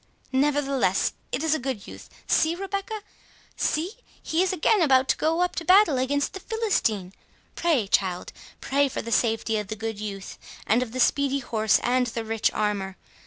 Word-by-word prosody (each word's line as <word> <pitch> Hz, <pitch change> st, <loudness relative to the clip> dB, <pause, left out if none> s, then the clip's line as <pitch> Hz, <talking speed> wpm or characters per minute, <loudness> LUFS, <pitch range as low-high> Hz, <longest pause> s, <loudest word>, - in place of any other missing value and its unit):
—Nevertheless, 275 Hz, -7 st, +1 dB, 0.2 s
it 255 Hz, +5 st, -2 dB
is 320 Hz, -1 st, +2 dB
a 315 Hz, -, 0 dB
good 255 Hz, -6 st, -4 dB
youth—See, 320 Hz, +2 st, -1 dB
Rebecca! 395 Hz, +3 st, -4 dB, 0.5 s
see, 325 Hz, +5 st, -1 dB, 0.3 s
he 320 Hz, +2 st, 0 dB
is 375 Hz, -, +2 dB
again 375 Hz, +3 st, +2 dB
about 265 Hz, -4 st, +4 dB
to -, -, +4 dB
go 325 Hz, +2 st, 0 dB
up 360 Hz, -, 0 dB
to 340 Hz, -, -1 dB
battle 365 Hz, -5 st, +5 dB
against 285 Hz, +2 st, 0 dB
the 385 Hz, -, -6 dB
Philistine—Pray, 310 Hz, -, -2 dB
child—pray 200 Hz, +9 st, -1 dB
for -, -, -4 dB
the 230 Hz, -, -6 dB
safety 225 Hz, -1 st, +1 dB
of 210 Hz, -, -5 dB
the 215 Hz, -, -4 dB
good 220 Hz, -1 st, -5 dB
youth,—and 210 Hz, +2 st, -3 dB
of 240 Hz, -2 st, -4 dB
the 255 Hz, -, -4 dB
speedy 280 Hz, +1 st, +2 dB
horse, 220 Hz, -5 st, +1 dB
and 250 Hz, 0 st, +2 dB
the 230 Hz, -1 st, -4 dB
rich 225 Hz, 0 st, +1 dB
armour. 200 Hz, -3 st, -2 dB
265 Hz, 165 wpm, -25 LUFS, 220-320 Hz, 0.5 s, battle